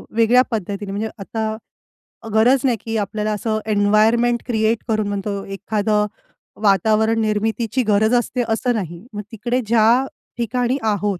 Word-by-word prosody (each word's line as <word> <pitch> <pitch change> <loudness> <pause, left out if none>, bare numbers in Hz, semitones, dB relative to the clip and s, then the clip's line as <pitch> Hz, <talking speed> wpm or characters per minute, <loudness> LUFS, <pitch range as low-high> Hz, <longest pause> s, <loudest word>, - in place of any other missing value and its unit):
वेगळ्या 230 +2 +5
पद्धतीने 200 -1 -3
म्हणजे 215 +2 -3
आता 220 +2 -3 0.8
गरज 245 +5 +4
नाही, 240 -3 +2
की 225 0 -3
आपल्याला 210 +1 -2
असं 215 +1 -1
एन्वायरमेंट 220 +4 +3
क्रिएट 220 -1 +1
करून 215 -2 0
म्हणतो 200 0 -3
एखादं 210 +1 0 0.6
वातावरण 215 +3 +3
निर्मितीची 220 +3 0
गरज 215 +2 +2
असते, 245 +1 0
असं 245 +3 +1
नाही. 175 -1 -5
मग 210 - -4
तिकडे 240 +3 -1
ज्या 235 +3 +4 0.3
ठिकाणी 245 +2 0
आहोत 205 -3 0
220 Hz, 135 wpm, -20 LUFS, 205-230 Hz, 0.8 s, वेगळ्या